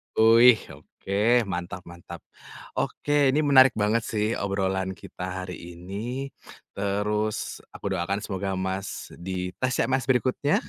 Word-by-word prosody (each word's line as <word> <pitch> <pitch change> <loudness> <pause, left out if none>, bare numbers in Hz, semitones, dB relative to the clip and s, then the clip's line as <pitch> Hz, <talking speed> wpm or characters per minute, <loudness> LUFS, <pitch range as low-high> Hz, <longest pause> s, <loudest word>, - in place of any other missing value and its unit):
Wih, 115 +2 +7 0.2
oke 100 - -12 0.4
mantap 90 +1 -4
mantap. 85 -1 -11 0.6
Oke, 145 - -3 0.2
ini 140 +3 +2
menarik 130 -1 +7
banget 110 +2 +2
sih 105 -1 0
obrolan 95 -1 -1
kita 90 - -9 0.2
hari 90 0 -6 0.2
ini. 115 +10 -5 0.4
Terus, 105 +2 -1 0.4
aku - - -10
doakan 95 +4 -1
semoga 95 -1 -3
Mas, 95 +1 -4
di 90 -1 -3
tes 130 0 0
CPNS 130 -2 0
berikutnya, 130 +3 +2
100 Hz, 125 wpm, -26 LUFS, 95-125 Hz, 0.6 s, Wih